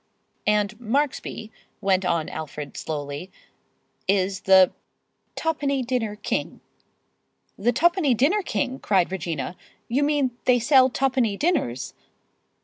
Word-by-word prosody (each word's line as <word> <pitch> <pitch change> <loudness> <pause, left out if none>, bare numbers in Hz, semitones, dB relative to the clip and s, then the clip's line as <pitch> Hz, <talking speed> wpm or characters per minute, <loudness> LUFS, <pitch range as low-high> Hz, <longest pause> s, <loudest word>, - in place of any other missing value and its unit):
"And 210 +1 +1
Marksby," 245 -2 -2 0.3
went 190 -1 +1
on 170 -3 0
Alfred, 150 -2 -7
slowly, 145 +3 -5 0.8
"is 190 -1 +1
the 190 -1 +7 0.6
Twopenny 285 -4 -1
Dinner 235 -4 -1
King." - - -3 1.0
"The 230 +5 +1
Twopenny 325 -1 +3
Dinner 305 - +3
King!" 265 -7 -2
cried 185 -3 +2
Regina. 170 -4 -3 0.3
"You 255 +5 +1
mean 290 -3 +2
they 250 -1 +5
sell 260 +2 +5
twopenny 255 -5 0
dinners?" 130 - -1
225 Hz, 110 wpm, -24 LUFS, 185-270 Hz, 1.0 s, the